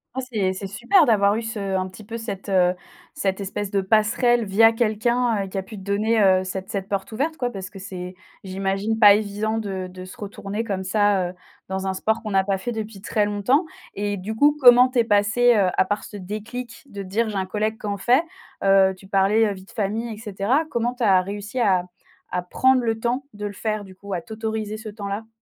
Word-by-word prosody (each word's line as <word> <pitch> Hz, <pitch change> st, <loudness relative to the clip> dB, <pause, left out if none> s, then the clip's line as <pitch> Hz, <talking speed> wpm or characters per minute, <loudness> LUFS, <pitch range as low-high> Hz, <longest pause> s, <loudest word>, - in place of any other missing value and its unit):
Ah -, -, -1 dB
c'est 190 Hz, -4 st, 0 dB
c'est 195 Hz, +1 st, -6 dB
super 265 Hz, -, +3 dB
d'avoir 205 Hz, -3 st, +3 dB
eu 225 Hz, -, -1 dB
ce 200 Hz, -4 st, -3 dB
un 185 Hz, 0 st, 0 dB
petit 185 Hz, +3 st, -12 dB
peu 230 Hz, +3 st, -6 dB
cette, 210 Hz, -3 st, -6 dB
heu, 180 Hz, -2 st, +3 dB, 0.4 s
cette 190 Hz, 0 st, -1 dB
espèce 200 Hz, +1 st, -4 dB
de 200 Hz, -1 st, +1 dB
passerelle 220 Hz, +4 st, +2 dB
via 225 Hz, +3 st, +5 dB
quelqu'un, 230 Hz, 0 st, +1 dB
heu, -, -, -8 dB
qui 190 Hz, -, -6 dB
a 190 Hz, -, -1 dB
pu 210 Hz, +2 st, -10 dB
te 190 Hz, -, -10 dB
donner, 215 Hz, +3 st, +1 dB
heu, 190 Hz, -2 st, +4 dB
cette 190 Hz, 0 st, -5 dB
cette 195 Hz, -2 st, -3 dB
porte 200 Hz, +2 st, -3 dB
ouverte 300 Hz, +8 st, -2 dB
quoi 245 Hz, -1 st, -1 dB
parce 190 Hz, -3 st, -7 dB
que 200 Hz, -, -12 dB
c'est 180 Hz, -1 st, -7 dB, 0.3 s
j'imagine 195 Hz, +3 st, -2 dB
pas 205 Hz, -2 st, +9 dB
évident 210 Hz, +1 st, -1 dB
de 190 Hz, -3 st, -4 dB
de 185 Hz, 0 st, -10 dB
se 185 Hz, -, -12 dB
retourner 205 Hz, +1 st, -5 dB
comme 195 Hz, -4 st, -3 dB
ça, 200 Hz, -2 st, +2 dB
heu, 180 Hz, -, -9 dB, 0.4 s
dans 190 Hz, 0 st, -3 dB
un 190 Hz, -, 0 dB
sport 220 Hz, +4 st, -1 dB
qu'on 215 Hz, -, -4 dB
n'a 190 Hz, 0 st, +3 dB
pas 195 Hz, 0 st, 0 dB
fait 240 Hz, +6 st, -4 dB
depuis 220 Hz, -3 st, -6 dB
très 210 Hz, 0 st, 0 dB
longtemps 210 Hz, -, +1 dB, 0.3 s
et 205 Hz, 0 st, -2 dB
du 205 Hz, +4 st, -5 dB
coup 290 Hz, +5 st, +4 dB
comment 250 Hz, -1 st, +8 dB
tu 255 Hz, -2 st, 0 dB
es -, -, +5 dB
passée, 220 Hz, +3 st, +3 dB
heu, 195 Hz, -3 st, +3 dB
à -, -, +4 dB
part 205 Hz, +2 st, -2 dB
ce 205 Hz, -, -9 dB
déclic 230 Hz, +6 st, -7 dB
de 200 Hz, -1 st, -6 dB
dire: 215 Hz, +4 st, -1 dB
«J'ai 210 Hz, -, -5 dB
un 190 Hz, -, -1 dB
collègue 215 Hz, +3 st, -2 dB
qui -, -, -9 dB
en 200 Hz, -, -2 dB
fait». 250 Hz, +9 st, +3 dB, 0.4 s
Heu, 195 Hz, -1 st, +5 dB
tu 190 Hz, -, -15 dB
parlais, 195 Hz, +3 st, +3 dB
heu, 205 Hz, -, -1 dB
vie 190 Hz, -1 st, -12 dB
de -, -, -17 dB
famille 220 Hz, +3 st, -2 dB
et 210 Hz, -, -9 dB
cetera, 220 Hz, +8 st, 0 dB
comment 240 Hz, +1 st, -1 dB
tu 245 Hz, -, -3 dB
as 190 Hz, -4 st, +5 dB
réussi 205 Hz, +5 st, -5 dB
à 190 Hz, -6 st, +3 dB, 0.5 s
à 180 Hz, -, -1 dB
prendre 255 Hz, +8 st, +2 dB
le 225 Hz, -1 st, -1 dB
temps 245 Hz, +4 st, -1 dB
de 210 Hz, 0 st, -6 dB
le 205 Hz, -, -4 dB
faire 215 Hz, +1 st, -3 dB
du 190 Hz, -1 st, -14 dB
coup? 200 Hz, +1 st, -8 dB
À 175 Hz, -, -2 dB
t'autoriser 220 Hz, 0 st, -4 dB
ce 220 Hz, 0 st, -8 dB
temps-là? 205 Hz, +1 st, -5 dB
205 Hz, 235 wpm, -23 LUFS, 195-225 Hz, 0.5 s, pas